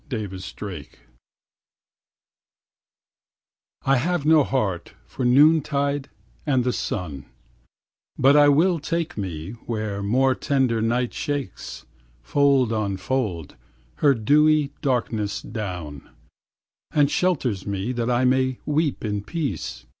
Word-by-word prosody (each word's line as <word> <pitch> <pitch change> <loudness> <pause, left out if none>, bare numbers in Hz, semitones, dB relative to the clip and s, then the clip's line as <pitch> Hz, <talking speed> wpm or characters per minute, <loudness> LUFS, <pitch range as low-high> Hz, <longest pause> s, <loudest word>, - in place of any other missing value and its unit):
83 110 -5 -3
THE 95 +2 -8
MOURNER 85 -8 -6 3.0
I 135 0 +4
have 165 +3 -1
no 155 -1 +6
heart 100 -11 -2
for 130 - -6
noon 150 +6 +6
tide 140 -1 -2 0.3
and 135 -4 +1
the 125 0 0
sun, 75 - -4 0.9
But 135 +2 +5
I 145 -1 +7
will 165 +4 +3
take 165 +2 -2
me 90 -4 -5 0.2
where 110 -3 -3
more 130 +6 +2
tender 130 -4 0
night 120 +2 0
Shakes, 145 - -5 0.4
fold 135 - +3
on 100 -3 -1
fold, 100 - -3 0.4
her 140 -2 +4
dewy 150 +5 +3
darkness 115 -6 -1
down, 90 - -6 0.8
And 145 -1 +2
shelters 130 - 0
me 100 +3 -2
that 120 -1 -2
I 125 +1 +2
may 130 0 +2
weep 150 -4 0
in 105 -1 -2
peace. 130 - -4
125 Hz, 115 wpm, -23 LUFS, 100-145 Hz, 3.0 s, I